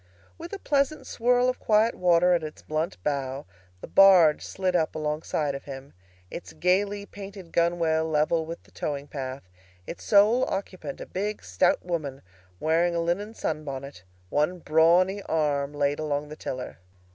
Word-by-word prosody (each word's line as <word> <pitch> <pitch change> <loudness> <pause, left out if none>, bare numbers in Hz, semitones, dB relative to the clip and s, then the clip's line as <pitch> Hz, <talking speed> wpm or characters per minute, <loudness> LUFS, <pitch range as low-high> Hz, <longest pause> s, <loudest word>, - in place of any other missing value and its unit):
With 335 +1 -9
a 400 - -4
pleasant 290 -3 0
swirl 245 +1 +2
of 255 - -1
quiet 220 +2 +3
water 180 0 +3
at 175 - +2
its 155 -1 -8
blunt 155 - -2
bow 135 -1 -2 0.4
the - - -8
barge 185 -6 +6
slid 185 -1 -2
up 160 -2 +1
alongside 150 -1 -2
of 140 - -7
him, 135 0 -9 0.4
its - - -8
gaily 200 +3 +1
painted 195 -4 -10
gunwale 165 -2 +1
level 155 +2 +2
with 165 +1 -7
the - - -23
towing 145 -1 -4
path, 135 -2 -6 0.4
its 170 - -8
sole 215 +5 +5
occupant 185 -7 -5
a - - -5
big 205 +3 -4
stout 90 - +1
woman 155 -6 -4 0.4
wearing 170 +2 +2
a - - +1
linen 190 +6 -2
sun 155 - -3
bonnet, 140 -4 -7 0.3
one 150 - +1
brawny 175 +5 +3
arm 145 -3 0
laid 145 0 0
along 150 -1 -2
the 150 - -7
tiller. 130 -8 -6
165 Hz, 160 wpm, -26 LUFS, 145-195 Hz, 0.4 s, barge